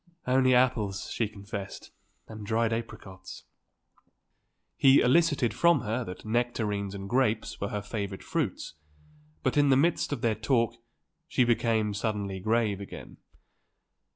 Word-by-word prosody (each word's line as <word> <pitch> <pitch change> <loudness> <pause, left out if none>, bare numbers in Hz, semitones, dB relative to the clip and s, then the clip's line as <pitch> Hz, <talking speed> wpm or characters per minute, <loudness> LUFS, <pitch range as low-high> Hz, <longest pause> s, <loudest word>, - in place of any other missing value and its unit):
"Only 130 0 +4
apples," 110 -6 +1
she 115 - 0
confessed, 100 -2 -8 0.4
"and 110 -1 -9
dried 115 +2 0
apricots." 105 -4 -7 1.3
He 135 0 +6
elicited 145 -3 +3
from 170 -5 +3
her 115 +2 -2
that 90 - -9
nectarines 110 -4 -1
and 100 0 -6
grapes 115 -1 0
were 100 - -1
her 105 -1 -4
favourite 100 -2 -5
fruits. - - -3 0.7
But - - 0
in 145 -1 +4
the 135 - +5
midst 165 +3 +1
of 140 -5 -3
their 115 -2 +2
talk 115 +1 +1 0.5
she 140 -6 +2
became 115 -3 +1
suddenly 100 -2 -3
grave 110 0 0
again. 100 - -10
110 Hz, 130 wpm, -28 LUFS, 100-125 Hz, 1.3 s, He